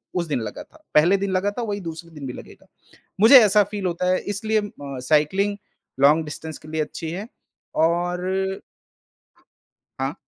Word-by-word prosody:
उस 175 -2 -1
दिन 145 - -1
लगा 105 -2 -6
था, 315 - -23
पहले 170 +6 +5
दिन 195 0 -2
लगा 190 +2 +1
था 240 +4 -5
वही 205 -2 -3
दूसरे 165 0 -7
दिन 150 -3 -9
भी 125 - -5
लगेगा। - - -13 0.6
मुझे 230 +6 +10
ऐसा 210 0 +5
फ़ील 200 -1 -5
होता 180 +1 -1
है 185 - +2
इसलिए 215 +1 -1
म 145 -9 -8
अ, - - -6
साइक्लिंग, 160 +9 +1 0.4
लॉन्ग 150 +3 +5
डिस्टेंस 155 +1 -7
के 155 - -15
लिए 160 0 -2
अच्छी 160 +1 -6
है 195 +6 -6 0.5
और 180 +4 0 1.4
हाँ। 135 +2 -1
180 Hz, 175 wpm, -23 LUFS, 155-200 Hz, 1.4 s, मुझे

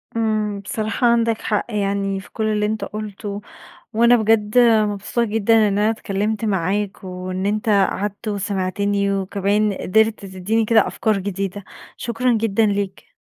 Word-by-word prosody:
امم. 215 -2 0
بصراحة 220 +4 -1
عندَك 230 -1 +2
حق 210 -2 -1
يعني 200 -2 -1
في 195 - -13
كل 220 - -3
اللي 210 -1 +1
أنتَ 215 +1 -2
قُلته، 210 -1 -6 0.5
وأنا 235 +2 +5
بجد 220 0 +2
مبسوطة 220 -1 +3
جدًا 225 +1 +2
إن 200 0 0
أنا 210 +1 +3
اتكلّمت 215 0 -2
معاك 195 0 -1
وإن 185 +1 -4
أنتَ 210 +2 -1
قعدت 205 +1 0
وسمعتني 200 0 -1
وكمان 200 +2 0
قدرت 220 +3 +1
تدّيني 195 +4 -1
كده 220 0 +4
أفكار 215 -2 0
جديدة. 195 0 -4 0.3
شكرًا 240 +2 0
جدًا 225 -1 +2
ليك. 200 -2 -3
210 Hz, 140 wpm, -21 LUFS, 195-220 Hz, 0.5 s, وأنا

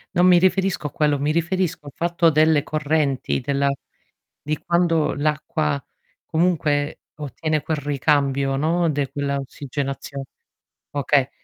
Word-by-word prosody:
Non 175 +1 +5
mi 180 -1 +7
riferisco 185 -2 +1
a - - -8
quello, 150 -2 +1
mi 145 +2 0
riferisco 170 -1 -1
al - - -7
fatto 170 0 +2
delle 155 -1 +4
correnti, 150 -3 0
della 140 +1 0 0.7
di 150 0 -2
quando 170 -2 +1
l'acqua 150 0 -1 0.5
comunque 155 -4 0
ottiene 155 +1 -2
quel 155 +1 -1
ricambio, 140 -1 +1
no. 165 +4 +1
De 145 -3 -1
quella 140 0 -1
ossigenazio 140 +1 -5 0.7
okay. 140 -1 +1
150 Hz, 125 wpm, -22 LUFS, 140-165 Hz, 0.7 s, mi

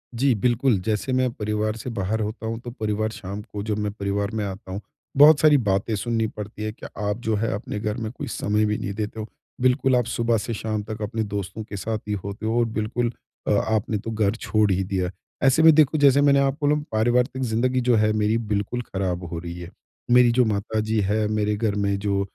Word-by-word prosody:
जी, 130 +3 +3
बिल्कुल 120 +2 +2
जैसे 110 +4 -1
मैं 130 0 +2
परिवार 105 0 -2
से 115 - -6
बाहर 110 -1 -2
होता 110 +2 -4
हूँ, 115 0 -3
तो 120 0 -8
परिवार 110 -2 -2
शाम 100 0 -6
को 105 -1 -7
जब 105 -1 -2
मैं 105 -1 -1
परिवार 100 0 -2
में 110 -1 -1
आता 95 -1 -7
हूँ, 100 +2 -4 0.4
बहुत 150 +1 +8
सारी 150 -2 +6
बातें 105 -2 0
सुननी 110 +2 0
पड़ती 105 0 -7
है 110 - -2
कि 105 - -12 0.2
आप 105 0 -1
जो 110 - +2
है, 110 +2 0
अपने 105 +1 -4
घर 105 +1 -2
में 110 -3 -4
कोई 140 +3 -7
समय 105 -2 0
भी 105 0 0
नहीं 100 - -4
देते 105 +1 -4
हो। 110 - -5 0.3
बिल्कुल 130 +1 +3
आप 125 -1 +2
सुबह 115 0 +1
से 115 +2 -3
शाम 110 -1 -3
तक 110 +1 -7
अपने 110 +1 -2
दोस्तों 100 0 -5
के 105 -1 -7
साथ 110 +4 -2
ही 105 - -1
होते 100 +2 -6
हो 115 +2 +1
और 120 - +3
बिल्कुल 115 +2 -1 0.4
अ, - - +2
आपने 110 +1 +1
तो 115 +3 -5
घर 110 -1 +1
छोड़ 110 -3 +1
ही 95 +1 +1
दिया। 95 -2 -1 0.3
ऐसे 135 +4 +4
में 160 0 +9
देखो, 155 0 +4
जैसे 140 -1 +5
मैंने 140 -1 +5
आपको 140 +2 +1
बोला 150 +1 +2
परिवार 120 +3 +3
तक 130 0 -9
ज़िंदगी 125 +3 +1
जो 120 - +5
है 110 - +3
मेरी 110 +1 +1 0.2
बिल्कुल 105 +4 -1
ख़राब 95 -5 -3
हो 85 - -3
रही 85 +1 -7
है। 85 -1 -8 0.4
मेरी 125 -1 +6
जो 125 +1 +3
माताजी 110 +1 -1
है, 105 +2 +1
मेरे 105 0 0
घर 105 -1 -1
में 100 -1 0
जो 100 -1 0
110 Hz, 230 wpm, -24 LUFS, 105-120 Hz, 0.4 s, में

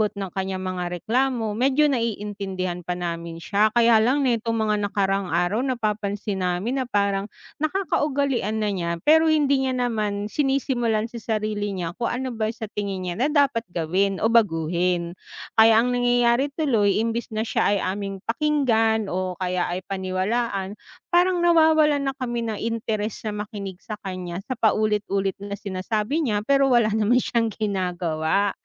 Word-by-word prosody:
ng 195 -1 -4
kaniyang 190 -1 -3
mga 185 -1 -3 0.2
reklamo, 235 -2 0
medyo 270 +5 +3
naiintindihan 200 -7 -3
pa 175 +1 -3
namin 170 -1 -5
siya. 210 +5 +2
Kaya 235 -1 +5
lang 275 +4 +2
nitong 230 -2 0
mga 210 - +2
nakaraang 195 -2 0
araw, 175 +6 +1
napapansin 210 -5 -2
namin 185 +9 -1
na - - -8
parang 200 -2 0 0.3
nakakaugalian 280 - 0
na 210 - +1
niya, 170 -3 -2
pero 320 +1 +5
hindi 280 -3 +2
niya 255 - -1
naman 215 -4 -1
sinisimulan 250 -6 0
sa 235 - -6 0.2
sarili 210 -1 -2
niya 175 -2 -3
kung 235 - 0
ano 255 +1 -3
ba 220 -1 -1
sa 220 - -5
tingin 195 -2 -3
niya 175 - -3
na 265 - +3
dapat 275 -6 +2
gawin 185 +4 0
o - - +5
baguhin. 175 -4 +1 0.5
Kaya 225 0 +7
ang 250 - 0
nangyayari 245 +1 +3
tuloy 225 -11 +2
imbes 230 +1 -2
na 215 - 0
siya - - 0
ay - - +1
aming 195 0 -3
pakinggan 230 -5 +1
o 185 0 -2
kaya 180 -1 -1
ay 180 +2 -4
paniwalaan, 195 +2 -2 0.4
parang 355 0 +3
nawawalan 315 -3 +4
na 270 - -3
kami 240 -3 -2
ng 225 -2 -3
interes 220 -2 -3
na 210 -1 -4
makinig 200 -4 -7
sa 215 - -6
kanya 185 -1 -5
sa 255 +4 -5
paulit-ulit 210 -3 +1
na 200 0 -5
sinasabi 210 - -2
niya, 210 -3 0
pero 275 +4 +3
wala 235 -3 +4
naman 220 +4 +2
siyang 230 -3 0
ginagawa, 180 -2 0
215 Hz, 155 wpm, -24 LUFS, 195-245 Hz, 0.5 s, Kaya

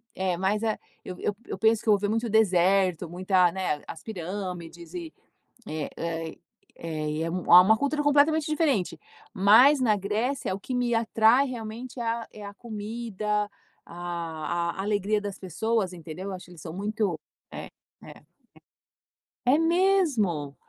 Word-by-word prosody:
é 185 -1 0
mais 195 +3 0
a 220 - 0 0.3
eu 180 - -7
eu 205 - -1
eu - - -5
penso 225 0 +3
que - - -15
eu - - +8
vou 205 - +2
ver 205 +1 -1
muito 225 +2 -1
deserto, 185 -4 +3
muita 180 0 +2
não 190 - -4
é 150 -5 -1
as 160 - -9
pirâmides 180 -3 -6
e, 340 -3 -6 0.5
é 155 -2 -4 0.9
é 155 -1 -4
é 165 - -2
uma 180 +4 +6
cultura 285 +4 0
completamente 295 +2 +3
diferente. 280 - 0 0.3
Mas 230 +8 +6
na 220 -4 +3
Grécia, 210 +2 -2
o - - -8
que 255 - -6
me 245 -1 +1
atrai 225 +3 +4
realmente 240 +1 -7
é, - - -2
a 230 0 -2
é 210 - -11
a 200 - -8
comida, 210 -1 -3 0.4
a 170 -1 -3
a - - -2
alegria 205 +1 0
das 205 -1 -5
pessoas 195 +2 -1
entendeu? 175 +3 -7
Acho 185 - -8
que 180 - -17
eles 170 -3 -13
são 160 - -7
muito 200 -3 -2 0.3
é - - -7 0.4
é. - - -13 1.2
É 255 +4 +5
mesmo. 320 - +2
205 Hz, 155 wpm, -26 LUFS, 180-230 Hz, 1.2 s, eu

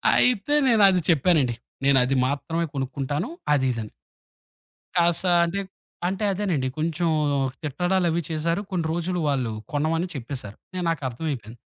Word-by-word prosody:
అయితే 250 +2 +2
నేను 225 -4 +5
అది 185 -2 +2
చెప్పానండి. 150 -6 +3 0.3
నేను 140 -1 +5
అది 130 +2 +1
మాత్రమే 165 +5 -1
కొనుక్కుంటాను. 135 - -2 0.2
అది 135 -2 +2
ఇదని. 110 -2 -5 1.1
కాస్త 170 +1 +2 0.2
అంటే 175 +4 -2 0.5
అంటే 190 +3 -2
అదేనండి. 180 -9 0
కొంచెం 165 +2 0 0.5
తిట్టడాలు 175 +5 0
అవి 165 +1 0
చేసారు. 165 +4 0
కొన్ని 175 -3 -1
రోజులు 175 +1 -1
వాళ్ళు 130 -5 0 0.2
కొనమని 160 +4 0
చెప్పేశారు. 125 -5 -6 0.2
నేను, 180 -1 -2
నాకు 165 -2 -1
అర్థమైపోయింది. 125 -3 -5
160 Hz, 135 wpm, -25 LUFS, 135-180 Hz, 1.1 s, నేను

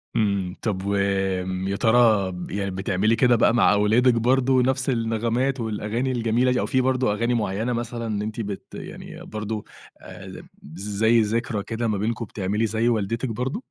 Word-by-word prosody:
إمم، 100 -4 0
طَب 100 -3 -2
وآمم 95 -2 -1
يا 100 - -1
ترى 110 -4 +3
ب 90 -1 -7
يعني 100 -1 -2
بتعملي 95 +4 +1
كده 120 +1 +4
بقى 115 - +3
مع 115 -3 +4
أولادِك 110 +5 +4
برضه 130 +2 +3
نَفْس 130 +1 0
النغمات 115 +3 0
والأغاني 110 +3 -2
الجميلة 120 +1 +1
دي؟ 125 - +1
أو - - 0
في 130 -2 +1
برضه 130 -4 +1
أغاني 115 +3 0
معيّنة 110 +1 -1
مثلًا 115 -3 -3
أنتِ 110 +2 -4
بت 100 -2 -5
يعني - - -9
برضه 105 0 -4 0.4
آآ، - - -11
يم - - -10 0.2
بز 80 +6 -11 0.2
زي 115 +2 +4
ذكرى 110 0 -1
كده 115 0 -3
ما 105 - 0
بينكم 115 +3 -2
بتعملي 105 +2 -2
زي 110 +2 +1
والدتِك 115 +2 -1
برضه؟ 125 - -3
110 Hz, 175 wpm, -24 LUFS, 100-120 Hz, 0.4 s, كده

